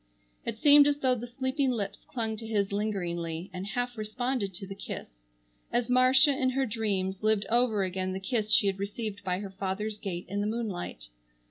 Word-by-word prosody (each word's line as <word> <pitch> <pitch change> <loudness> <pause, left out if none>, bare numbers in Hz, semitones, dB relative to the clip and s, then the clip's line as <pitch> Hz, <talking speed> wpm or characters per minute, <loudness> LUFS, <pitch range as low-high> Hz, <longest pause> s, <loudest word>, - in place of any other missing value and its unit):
It - - -2
seemed 290 +2 +8
as 290 -1 +2
though 260 -3 +2
the 240 0 -4
sleeping 260 +2 -1
lips 205 -5 -3
clung 225 -3 -2
to 225 0 -7
his 205 -3 0
lingeringly, 175 -5 -2
and 185 +2 -5
half 245 +3 -2
responded 215 0 -2
to 195 - -5
the 195 - -7
kiss, - - -8 0.4
as 240 0 0
Marcia 255 +3 +6
in 265 -1 +1
her 265 +1 +1
dreams 200 -4 -1
lived 215 -2 +2
over 235 -4 +3
again 185 0 -2
the 190 - -3
kiss 215 +2 -1
she - - +6
had 195 -1 0
received 205 0 -4
by 185 0 -1
her 200 -2 -6
father's 200 +2 -3
gate 180 -4 -4
in 200 +3 -2
the 205 - 0
moonlight. 195 - -4
210 Hz, 195 wpm, -29 LUFS, 195-245 Hz, 0.4 s, seemed